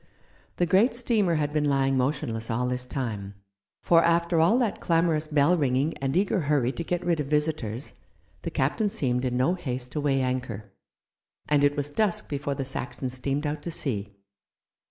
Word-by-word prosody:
The 175 - +1
great 200 +8 +3
steamer 220 -8 +1
had 150 -1 -1
been 150 -1 +1
lying 135 -1 +2
motionless 130 -4 -1
all 120 +2 0
this 125 0 -3
time, 105 -7 -4 0.5
for, 165 -1 +5
after 170 0 +2
all 170 +9 +4
that 240 -5 0
clamorous 165 -2 +1
bell 155 +3 +3
ringing 140 0 +1
and 135 +3 0
eager 195 +1 +2
hurry 140 -5 +1
to 170 - -5
get 175 +1 -2
rid 170 -2 +1
of 145 - -2
visitors, 150 -5 -1 0.5
the - - -4
captain 215 -3 0
seemed 130 - -1
in 125 -1 -1
no 130 +8 +2
haste 125 -8 -4
to 150 - -2
weigh 135 -2 +1
anchor, 125 -5 -3 0.8
and 145 -1 +3
it 145 0 +3
was 145 0 -2
dusk 205 +2 0
before 140 -1 -2
the 135 - -3
Saxon 130 0 -3
steamed 135 +3 -2
out 145 0 -2
to 170 - -5
sea. 105 -10 -2
145 Hz, 180 wpm, -26 LUFS, 130-170 Hz, 0.8 s, for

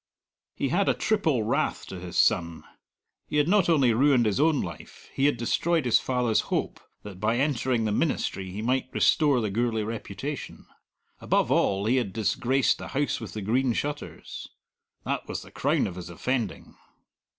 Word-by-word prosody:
He - - -1
had - - +2
a - - +2
triple 160 - +1
wrath 135 +8 -1
to 95 - -8
his 90 0 -6
son. 85 -6 +2 0.6
He 150 - -2
had 150 0 +3
not 190 -1 +3
only 135 -8 +4
ruined 130 0 +4
his 105 +3 0
own 155 -1 +3
life; 85 -4 -8
he 135 - +2
had 145 - +1
destroyed 160 +6 0
his 120 - +4
father's 125 -4 +1
hope - - -2 0.2
that 100 -3 -9
by 110 +3 +1
entering 130 -4 0
the 105 - 0
ministry 105 - -1
he 100 +4 -5
might 130 +2 0
restore 145 -5 +3
the 105 -2 -2
Gourlay 115 0 0
reputation. 115 +5 -6 0.5
Above - - +1
all, 100 +1 +2
he 125 +4 +2
had 110 -7 -1
disgraced 125 +4 +1
the - - -7
House 140 +2 -1
with 110 - -7
the 105 - -5
Green 125 +4 +1
Shutters. 145 +4 -5 0.6
That - - -2
was - - -5
the - - -15
crown - - +1
of 95 -3 -5
his 90 -1 -7
offending. 120 +7 -3
120 Hz, 175 wpm, -26 LUFS, 105-140 Hz, 0.6 s, only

